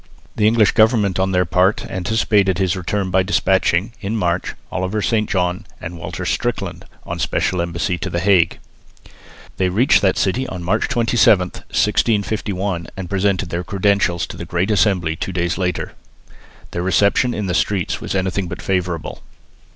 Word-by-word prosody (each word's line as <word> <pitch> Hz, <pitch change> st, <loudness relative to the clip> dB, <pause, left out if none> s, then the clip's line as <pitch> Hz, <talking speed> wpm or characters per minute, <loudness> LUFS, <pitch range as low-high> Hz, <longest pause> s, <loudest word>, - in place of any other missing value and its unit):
The 105 Hz, -, +3 dB
English 110 Hz, -1 st, +4 dB
government 110 Hz, -4 st, +3 dB
on 95 Hz, 0 st, +1 dB
their 90 Hz, -1 st, +2 dB
part 90 Hz, +4 st, +2 dB
anticipated 100 Hz, -1 st, +1 dB
his 95 Hz, -2 st, +1 dB
return 95 Hz, +1 st, -2 dB
by 95 Hz, +1 st, +3 dB
despatching, 95 Hz, +1 st, +1 dB
in 110 Hz, +3 st, -2 dB
March, 90 Hz, -2 st, -1 dB, 0.2 s
Oliver 95 Hz, +4 st, -2 dB
St 110 Hz, 0 st, 0 dB
John 90 Hz, -2 st, 0 dB, 0.2 s
and 85 Hz, +1 st, -7 dB
Walter 85 Hz, -, -6 dB
Strickland -, -, -2 dB, 0.2 s
on -, -, -4 dB
a -, -, -10 dB
special 90 Hz, -2 st, 0 dB
embassy 85 Hz, +1 st, -2 dB
to 95 Hz, -, -3 dB
the 85 Hz, -, -2 dB
Hague. 90 Hz, -2 st, +3 dB, 1.0 s
They 95 Hz, -1 st, +1 dB
reached 110 Hz, +9 st, +3 dB
that 95 Hz, -2 st, +2 dB
city 125 Hz, +7 st, 0 dB
on 90 Hz, -2 st, -6 dB
March 105 Hz, +6 st, 0 dB
27, 115 Hz, -6 st, +3 dB
1651, 100 Hz, -5 st, -1 dB
and 95 Hz, -2 st, -6 dB
presented 95 Hz, -2 st, 0 dB
their 85 Hz, +1 st, -2 dB
credentials 95 Hz, -3 st, +1 dB
to -, -, -9 dB
the -, -, -6 dB
Great 90 Hz, +5 st, -1 dB
Assembly 95 Hz, -6 st, +2 dB
two 95 Hz, -, -4 dB
days 85 Hz, 0 st, -1 dB
later. 90 Hz, -3 st, -2 dB, 0.8 s
Their 85 Hz, -, -3 dB
reception 100 Hz, +6 st, +2 dB
in 105 Hz, -, -2 dB
the 90 Hz, -, -1 dB
streets 95 Hz, -3 st, 0 dB
was -, -, -4 dB
anything 95 Hz, 0 st, -1 dB
but -, -, -6 dB
favourable. 90 Hz, -4 st, -2 dB
95 Hz, 165 wpm, -19 LUFS, 90-105 Hz, 1.0 s, English